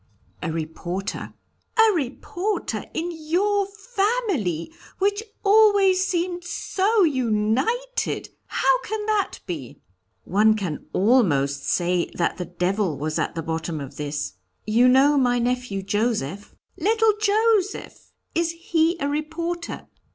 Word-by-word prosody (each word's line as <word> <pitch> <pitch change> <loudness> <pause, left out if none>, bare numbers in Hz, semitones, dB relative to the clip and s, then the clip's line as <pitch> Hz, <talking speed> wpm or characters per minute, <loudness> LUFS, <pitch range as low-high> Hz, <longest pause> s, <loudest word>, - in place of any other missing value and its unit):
"A 160 - -2
reporter." 165 +4 -4 0.4
"A 445 -1 +6
reporter 350 - -2
in 340 +2 -2
your 375 +6 0
family, 395 - -1 0.2
which 405 +2 +1 0.2
always 400 -3 +5
seemed 350 0 -1
so 395 +4 +1
united! 260 - 0 0.2
How - - +2
can 430 0 -3
that 425 -2 0
be?" 150 -9 -6 0.4
"One 215 +3 +3
can 185 -8 -4
almost 145 - +2
say 175 0 +1
that 170 - 0
the 180 - -3
devil 180 -1 -1
was 155 +1 -2
at - - -2
the 165 - -3
bottom 160 0 -3
of 140 0 -8
it. 145 -9 -3 0.3
You 230 +4 +4
know 275 +3 +5
my 245 -2 +3
nephew 245 -5 -1
Joseph 205 - -2
" - - -42
"Little 445 +4 +3
Joseph! 425 -1 +1 0.2
Is 335 0 +1 0.2
he 330 +1 +3
a 280 - -1
reporter?" 335 +4 -3
280 Hz, 120 wpm, -24 LUFS, -, 0.4 s, A